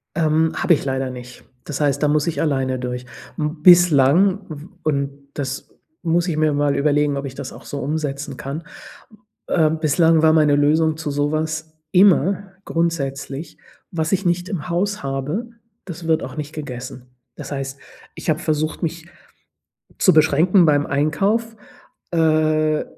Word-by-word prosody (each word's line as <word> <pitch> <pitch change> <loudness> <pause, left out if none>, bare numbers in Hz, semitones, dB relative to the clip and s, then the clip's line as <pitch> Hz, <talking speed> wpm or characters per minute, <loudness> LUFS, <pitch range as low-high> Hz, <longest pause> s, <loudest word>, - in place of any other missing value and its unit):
Ähm, 160 0 +2
habe 170 - +3
ich - - 0
leider 135 -1 -2
nicht. 125 0 -10 0.2
Das 150 - -5
heißt, 145 -2 +1
da 150 - +3
muss 150 +1 +1
ich 165 - -1
alleine 135 -4 0
durch. 125 0 -4 0.3
M 150 0 -3
bislang 175 +2 +5
w 150 0 -8 0.2
und 140 -1 -2
das 135 -1 -5 0.3
muss 170 +1 +1
ich 165 - -1
mir 155 -1 +2
mal 145 0 +1
überlegen, 145 0 +2
ob 140 0 -4
ich 135 -1 -7
das - - -7
auch - - -12
so 145 - -5
umsetzen 145 -1 -3
kann. 140 +5 -6 0.8
Ähm, 160 -2 +2
bislang 160 +1 +3
war 160 0 +5
meine 150 -2 +4
Lösung 155 +2 +2
zu 155 -2 -4
sowas, 155 +2 -2
immer 195 +1 +3
grundsätzlich, 145 -3 -3 0.3
was 160 0 -2
ich 195 0 0
nicht 175 +2 0
im 180 -4 -4
Haus 200 +4 -1
habe, 140 - -3 0.4
das 170 -2 -7
wird 160 0 +2
auch 130 +2 -7
nicht 150 0 -5
gegessen. 125 -4 -7 0.3
Das - - -9
heißt, 135 -1 -5 0.4
ich - - -5
habe 155 0 +1
versucht, 155 -1 -2
mich 165 +1 -4 0.9
zu - - +5
beschränken 160 +4 +4
beim 145 -1 +3
Einkauf. 195 +11 0 0.5
Äh, 155 -2 +2
155 Hz, 155 wpm, -21 LUFS, 140-165 Hz, 0.9 s, bislang